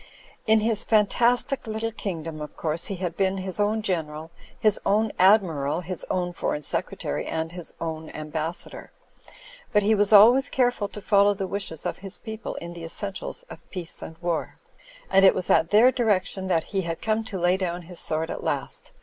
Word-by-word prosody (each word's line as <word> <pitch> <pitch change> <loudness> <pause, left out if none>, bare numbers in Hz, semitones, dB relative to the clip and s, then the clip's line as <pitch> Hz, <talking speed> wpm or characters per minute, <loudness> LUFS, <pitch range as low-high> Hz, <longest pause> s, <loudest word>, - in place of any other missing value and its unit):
In 220 0 +5
his 220 -1 +1
fantastic 235 +4 +2
little 220 +1 -2
kingdom, 165 -7 -5
of 150 - -8
course, 160 +1 -2
he 195 - -3
had 175 -2 -4
been 190 +1 +1
his 190 +1 -4
own 210 +1 +1
General, 160 -4 -3 0.3
his 215 -3 +3
own 215 +1 +2
Admiral, 175 -6 +3
his 180 0 -4
own 180 -1 -1
Foreign 150 -3 -2
Sec - - +1
retary - - -4
and 160 0 -2
his 175 -1 -7
own 160 -1 -5
Ambassador; 155 +2 -4 0.8
but 210 -3 +3
he 215 +2 +4
was 205 -1 +2
always 235 +6 +7
careful 245 -5 +1
to 210 - -9
follow 200 0 +4
the 195 0 -3
wishes 190 -5 -4
of - - -3
his 195 0 -8
people 220 -1 -6
in 170 0 -7
the 170 -1 -9
es 165 - -3
sentials 200 - -4
of - - -10
peace 180 -4 -6
and 160 - -8
war; 170 -2 -2 0.5
and 195 - +5
it 190 - +7
was 180 - 0
at 165 - +4
their 225 +5 +6
direction 200 -6 0
that 165 -3 +2
he 195 - +1
had 165 -2 -4
come 220 0 0
to 200 - -5
lay 175 +1 +3
down 180 -2 -3
his 175 +1 -7
sword 160 +1 0
at - - -6
last. - - -3
190 Hz, 195 wpm, -25 LUFS, 165-215 Hz, 0.8 s, always